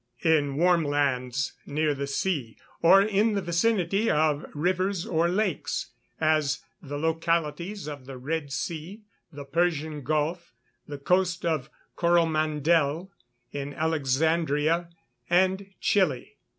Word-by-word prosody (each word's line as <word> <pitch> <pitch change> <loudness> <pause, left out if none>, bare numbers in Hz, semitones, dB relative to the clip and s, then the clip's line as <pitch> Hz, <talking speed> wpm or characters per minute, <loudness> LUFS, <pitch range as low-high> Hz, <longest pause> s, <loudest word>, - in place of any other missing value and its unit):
_ 160 -1 +6
In 145 -2 -2
warm 175 +2 +3
lands 140 -2 0
near 150 +1 +1
the 140 0 -4
sea, 140 -5 -2 0.2
or 190 +4 +7
in 210 +1 +2
the 200 - 0
vicinity 195 +3 +1
of 150 -1 +2
rivers 185 +3 0
or 165 0 +1
lakes, 185 - -1 0.3
as 155 -2 +1 0.2
the 145 -3 -6
localities 165 +4 -1
of 145 -4 -8
the 135 -1 -7
Red 145 +2 -3
Sea, 165 +9 -5 0.3
the 145 -1 -9
Persian 155 -1 -1
Gulf 155 +5 -2 0.3
the 145 - -6
coast 180 +4 +1
of 155 -4 -1 0.3
Coromandel, 160 0 +2 0.4
in 140 0 -5
Alexandria, 160 +2 +1 0.4
and 190 +2 +2
Chili. 170 -11 0
160 Hz, 120 wpm, -27 LUFS, 145-175 Hz, 0.4 s, or